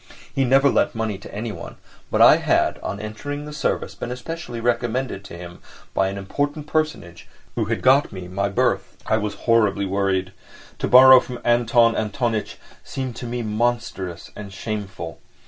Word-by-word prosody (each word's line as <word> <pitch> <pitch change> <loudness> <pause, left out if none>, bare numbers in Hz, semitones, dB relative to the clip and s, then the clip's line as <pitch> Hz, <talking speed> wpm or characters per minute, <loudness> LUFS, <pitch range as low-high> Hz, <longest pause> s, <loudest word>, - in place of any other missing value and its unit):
He 135 - +1
never 135 +2 +5
lent - - +1
money 110 -3 -2
to - - -11
anyone, 105 0 -6 0.3
but - - +4
I - - +8
had, - - +1
on 100 - -5
entering 145 +8 -6
the 150 - -8
service, 150 - -2
been 125 - -5
specially 125 -2 -6
recommended 120 -2 -1
to 85 - -9
him 85 0 -10 0.3
by 95 - +2
an 100 +1 -4
important 145 +10 -3
personage 150 - -3 0.3
who 115 - -1
had 115 +1 -2
got 135 +3 +4
me 95 -3 -7
my 100 +2 -1
berth. 100 - 0
I 110 - +2
was 105 -2 -3
horribly 105 -4 +3
worried. 95 -1 0 0.5
To - - -1
borrow 130 +1 +9
from 125 0 -7
Anton 120 -1 +3
Antonitch 110 +1 -2 0.3
seemed 130 -3 -5
to 125 - -6
me 120 0 -3
monstrous 110 -6 -2
and 100 -2 -8
shameful. 95 -6 -6
115 Hz, 165 wpm, -22 LUFS, 100-125 Hz, 0.5 s, borrow